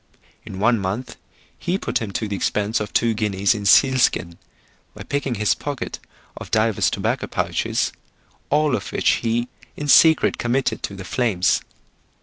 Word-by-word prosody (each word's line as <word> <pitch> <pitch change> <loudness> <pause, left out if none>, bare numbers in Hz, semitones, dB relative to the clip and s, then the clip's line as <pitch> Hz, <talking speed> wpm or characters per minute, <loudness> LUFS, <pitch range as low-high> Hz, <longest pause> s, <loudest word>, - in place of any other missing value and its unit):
In 95 - -9
one 115 +3 +2
month 110 +5 -4 0.4
he 175 +2 -1
put - - -2
him 110 - -4
to 110 - -2
the 100 - -3
expense 105 +3 -1
of 105 -2 -5
two 115 -1 +2
guineas 105 0 +1
in 105 -2 -3
seal 130 +4 +5
skin; 85 -7 +1 0.6
by - - -8
picking 140 -3 -2
his 105 0 +2
pocket 145 -3 -5 0.4
of - - -9
divers 110 -1 +2
tobacco - - -2
pouches, - - -1 0.6
all 150 -2 +2
of 100 - -5
which - - +2
he 120 +1 0 0.3
in 150 - -4
secret 160 +2 +5
committed 125 +3 0
to 100 - -5
the 95 -1 -8
flames. 100 -5 +1
115 Hz, 160 wpm, -21 LUFS, 100-130 Hz, 0.6 s, seal